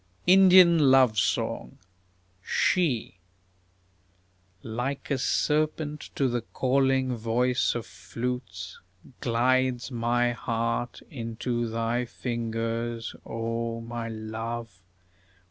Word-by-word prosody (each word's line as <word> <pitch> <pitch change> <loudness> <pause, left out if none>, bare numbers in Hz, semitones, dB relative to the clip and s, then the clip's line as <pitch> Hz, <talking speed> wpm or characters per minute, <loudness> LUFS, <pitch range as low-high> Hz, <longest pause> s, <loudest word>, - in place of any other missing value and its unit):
INDIAN 185 -2 +7
LOVE 130 -5 +5
SONG - - -1 0.6
She 125 - 0 1.4
Like 125 +6 -4
a 135 - +1
serpent 150 +2 0
to 135 - +2
the 120 -1 -1
calling 130 +1 +1
voice 120 +1 +1
of 120 -3 -3
flutes, 100 -2 -6 0.4
Glides 125 +2 +1
my 120 0 +1
heart 115 +1 -2
into 120 -2 -3
thy 115 +2 -1
fingers, 115 -1 -3
O 115 0 -3
my 115 0 -5
Love! 110 -1 -6
120 Hz, 85 wpm, -27 LUFS, 115-130 Hz, 1.4 s, INDIAN